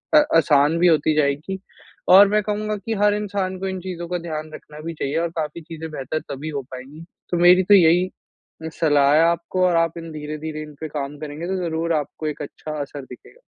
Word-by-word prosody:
अ, -, -, +9 dB, 0.2 s
आसान 150 Hz, 0 st, +4 dB
भी 180 Hz, -, +5 dB
होती 155 Hz, -2 st, +3 dB
जाएगी 150 Hz, +5 st, 0 dB, 0.5 s
और 195 Hz, +2 st, +9 dB
मैं 210 Hz, +1 st, +2 dB
कहूँगा 215 Hz, +1 st, -2 dB
कि 215 Hz, +3 st, -4 dB
हर 205 Hz, 0 st, +4 dB
इंसान 200 Hz, -2 st, -2 dB
को 195 Hz, -, -3 dB
इन 190 Hz, 0 st, -4 dB
चीज़ों 175 Hz, -2 st, -6 dB
का 180 Hz, -, -1 dB
ध्यान 155 Hz, -2 st, -6 dB
रखना 150 Hz, 0 st, -13 dB
भी 165 Hz, +2 st, -5 dB
चाहिए 140 Hz, -2 st, -3 dB
और 170 Hz, 0 st, -1 dB
काफ़ी 155 Hz, +1 st, -3 dB
चीज़ें 160 Hz, 0 st, -8 dB
बेहतर 150 Hz, +1 st, -3 dB
तभी 140 Hz, +3 st, -5 dB
हो 145 Hz, -2 st, -3 dB
पाएँगी। 135 Hz, +5 st, -10 dB, 0.3 s
तो 175 Hz, -, +1 dB
मेरी 180 Hz, +2 st, +6 dB
तो, 205 Hz, -, +4 dB
यही 180 Hz, -1 st, +5 dB, 0.7 s
सलाह 145 Hz, -3 st, +4 dB
है 155 Hz, -, +5 dB
आपको 170 Hz, +2 st, 0 dB
और 175 Hz, -, +1 dB
आप 165 Hz, 0 st, +1 dB
इन 165 Hz, -1 st, -8 dB
धीरे-धीरे 155 Hz, +1 st, -6 dB
इन 150 Hz, 0 st, -11 dB
पे 160 Hz, -, -3 dB
काम 145 Hz, -1 st, -5 dB
करेंगे, 155 Hz, +2 st, -6 dB
तो 190 Hz, -, -1 dB
ज़रूर 165 Hz, 0 st, -1 dB
आपको 155 Hz, 0 st, -3 dB
एक 150 Hz, -, -4 dB
अच्छा 155 Hz, +1 st, -7 dB
असर 140 Hz, -1 st, -7 dB
दिखेगा। 130 Hz, -, -15 dB
160 Hz, 210 wpm, -22 LUFS, 150-180 Hz, 0.7 s, अ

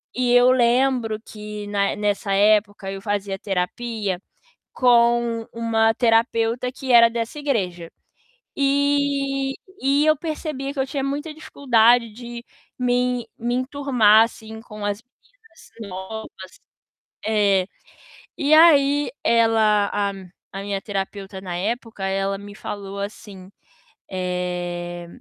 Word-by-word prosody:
e 245 Hz, -1 st, +1 dB
eu 245 Hz, +1 st, +6 dB
lembro 245 Hz, -2 st, +2 dB
que 210 Hz, -2 st, -8 dB
na 200 Hz, -1 st, 0 dB
nessa 205 Hz, -1 st, -1 dB
época 205 Hz, -1 st, +2 dB
eu 195 Hz, 0 st, -7 dB
fazia 200 Hz, -2 st, -3 dB
terapia, 200 Hz, +1 st, -3 dB, 0.6 s
com 235 Hz, -2 st, +3 dB
uma 225 Hz, -1 st, +2 dB
terapeuta 230 Hz, +1 st, +1 dB
que 260 Hz, -1 st, -3 dB
era 235 Hz, -1 st, +7 dB
dessa 230 Hz, +5 st, -4 dB
igreja. 185 Hz, -, -2 dB, 0.7 s
E 275 Hz, -1 st, +1 dB, 0.3 s
e 280 Hz, +2 st, +3 dB
eu 310 Hz, -, +5 dB
percebia 300 Hz, -3 st, -4 dB
que -, -, -9 dB
eu 265 Hz, -, 0 dB
tinha 275 Hz, 0 st, -3 dB
muita 290 Hz, +3 st, -3 dB
dificuldade 240 Hz, -6 st, +3 dB
de 240 Hz, +1 st, -9 dB, 0.3 s
me 250 Hz, -1 st, 0 dB
me 240 Hz, +1 st, -2 dB
enturmar, 255 Hz, -5 st, +4 dB
assim, 220 Hz, -1 st, -9 dB
com 210 Hz, -3 st, -9 dB
as 205 Hz, +2 st, -2 dB, 0.3 s
meninas 445 Hz, -8 st, -21 dB, 0.2 s
novas. 190 Hz, 0 st, -9 dB, 0.7 s
É. 200 Hz, -4 st, +2 dB, 0.7 s
E 300 Hz, -1 st, +2 dB
aí 290 Hz, -4 st, +5 dB
ela, 220 Hz, -3 st, +3 dB
a 200 Hz, -1 st, 0 dB, 0.4 s
a 195 Hz, -, -5 dB
minha 200 Hz, -1 st, -3 dB
terapeuta 195 Hz, -1 st, -5 dB
na 180 Hz, -2 st, -5 dB
época, 225 Hz, +1 st, -4 dB
ela 195 Hz, 0 st, -1 dB
me 205 Hz, 0 st, -11 dB
falou 200 Hz, -1 st, -7 dB
assim. 200 Hz, -2 st, -8 dB, 0.6 s
Eh, 175 Hz, -1 st, -4 dB
225 Hz, 120 wpm, -22 LUFS, 200-255 Hz, 0.7 s, era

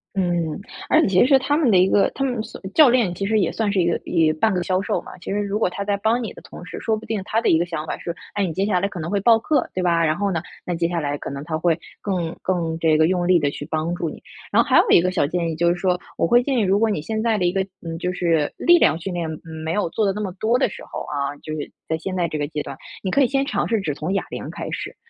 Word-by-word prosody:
嗯， 175 Hz, -3 st, 0 dB, 0.3 s
而 315 Hz, -, +5 dB
且 -, -, +2 dB
其 190 Hz, +3 st, +4 dB
实 275 Hz, -1 st, +6 dB
他 265 Hz, +2 st, 0 dB
们 300 Hz, -6 st, +3 dB
的 195 Hz, -, +5 dB
一 185 Hz, +1 st, +5 dB
个 195 Hz, -, +3 dB
他 270 Hz, -, -1 dB
们 245 Hz, -4 st, -1 dB
私 -, -, -9 dB
教 300 Hz, -4 st, +7 dB
练 235 Hz, -7 st, +2 dB
其 195 Hz, +3 st, -3 dB
实 220 Hz, +1 st, +2 dB
也 185 Hz, -, +1 dB
算 215 Hz, -3 st, -1 dB
是 195 Hz, -, +1 dB
一 175 Hz, -, +3 dB
个 170 Hz, -, +2 dB
一 160 Hz, -3 st, +2 dB
半 215 Hz, +8 st, +1 dB
个 180 Hz, -1 st, 0 dB
销 185 Hz, +1 st, 0 dB
售 -, -, -1 dB
嘛。 -, -, -11 dB
其 175 Hz, -, -6 dB
实 205 Hz, -, 0 dB
如 205 Hz, +1 st, -1 dB
果 200 Hz, -, +2 dB
他 200 Hz, +2 st, -4 dB
在 200 Hz, 0 st, 0 dB
帮 225 Hz, +4 st, +1 dB
你 220 Hz, -, -5 dB
的 -, -, -13 dB
同 -, -, -11 dB
时， -, -, -7 dB
说 220 Hz, -1 st, 0 dB
不 220 Hz, -, -10 dB
定 215 Hz, -3 st, -2 dB
他 220 Hz, -, +1 dB
的 -, -, +2 dB
一 160 Hz, -, +4 dB
个 175 Hz, -, +1 dB
想 165 Hz, -3 st, -4 dB
法 -, -, -3 dB
是， 170 Hz, -, -5 dB, 0.2 s
哎， 205 Hz, -, 0 dB
你 180 Hz, -, -1 dB
接 190 Hz, +5 st, -1 dB
下 200 Hz, -3 st, +2 dB
来 200 Hz, -, 0 dB
可 185 Hz, -3 st, -8 dB
能 165 Hz, +4 st, -4 dB
会 200 Hz, -, +1 dB
报 230 Hz, +1 st, +6 dB
课， 295 Hz, +6 st, 0 dB
对 185 Hz, -, -2 dB
吧？ 170 Hz, -1 st, +2 dB
然 155 Hz, -1 st, +2 dB
后 200 Hz, -1 st, 0 dB
呢， 165 Hz, -, -1 dB, 0.2 s
那 175 Hz, -, -2 dB
接 170 Hz, 0 st, 0 dB
下 170 Hz, -1 st, -1 dB
来 145 Hz, -1 st, -2 dB
可 -, -, -6 dB
能 140 Hz, +1 st, -6 dB
他 155 Hz, 0 st, -3 dB
会 170 Hz, -1 st, +1 dB, 0.2 s
更 180 Hz, -5 st, -2 dB
更 170 Hz, -3 st, -1 dB
这 160 Hz, -2 st, +3 dB
个 160 Hz, +1 st, +4 dB
用 180 Hz, -1 st, 0 dB
力 180 Hz, -1 st, +5 dB
地 145 Hz, -2 st, 0 dB
去 145 Hz, -, -7 dB
帮 160 Hz, +2 st, -1 dB
助 170 Hz, -2 st, -2 dB
你。 -, -, -10 dB, 0.3 s
然 -, -, +5 dB
后 -, -, -2 dB
还 -, -, +5 dB
有 -, -, +3 dB
一 -, -, +7 dB
个 185 Hz, +1 st, +1 dB
小 170 Hz, -6 st, +1 dB
建 170 Hz, +1 st, -1 dB
议， 160 Hz, -, -4 dB
就 170 Hz, +2 st, +2 dB
是 175 Hz, -, +2 dB
说 180 Hz, 0 st, 0 dB, 0.2 s
我 -, -, +2 dB
会 240 Hz, +8 st, +5 dB
建 265 Hz, 0 st, -1 dB
议， -, -, +3 dB
如 195 Hz, 0 st, +2 dB
果 225 Hz, 0 st, +3 dB
你 200 Hz, -8 st, -1 dB
现 220 Hz, +6 st, -2 dB
在 225 Hz, -2 st, +1 dB
的 180 Hz, -, 0 dB
一 175 Hz, -, +1 dB
个， 195 Hz, -, +1 dB, 0.2 s
嗯， 165 Hz, 0 st, -4 dB
就 180 Hz, 0 st, -1 dB
是 165 Hz, -4 st, +1 dB
力 345 Hz, 0 st, +5 dB
量 160 Hz, -, +4 dB
训 180 Hz, +2 st, -5 dB
练， 170 Hz, -2 st, -2 dB, 0.2 s
嗯， 160 Hz, -1 st, -8 dB
没 160 Hz, +1 st, -2 dB
有 205 Hz, -3 st, 0 dB
做 210 Hz, +2 st, +1 dB
得 195 Hz, -, +1 dB
那 210 Hz, -, -5 dB
么 195 Hz, -3 st, -3 dB
多 230 Hz, +3 st, +2 dB
的 265 Hz, -, +2 dB
时 -, -, -10 dB
候 -, -, -6 dB
啊， 140 Hz, 0 st, -3 dB
就 155 Hz, -, -5 dB
是 155 Hz, -1 st, -5 dB, 0.2 s
在 160 Hz, -, 0 dB
现 185 Hz, +2 st, -4 dB
在 175 Hz, -2 st, +1 dB
这 155 Hz, -1 st, -4 dB
个 145 Hz, -, -1 dB
阶 150 Hz, -1 st, -4 dB
段， 140 Hz, -, -7 dB, 0.3 s
你 190 Hz, -, -1 dB
可 280 Hz, -, +3 dB
以 260 Hz, -, +5 dB
先 275 Hz, +2 st, 0 dB
尝 -, -, -1 dB
试 225 Hz, -1 st, +1 dB
只 160 Hz, -7 st, -2 dB
从 155 Hz, +5 st, -4 dB
哑 195 Hz, -, -1 dB
铃 -, -, -5 dB
开 -, -, -6 dB
始。 -, -, -5 dB
180 Hz, 350 characters per minute, -22 LUFS, 165-210 Hz, 0.3 s, 教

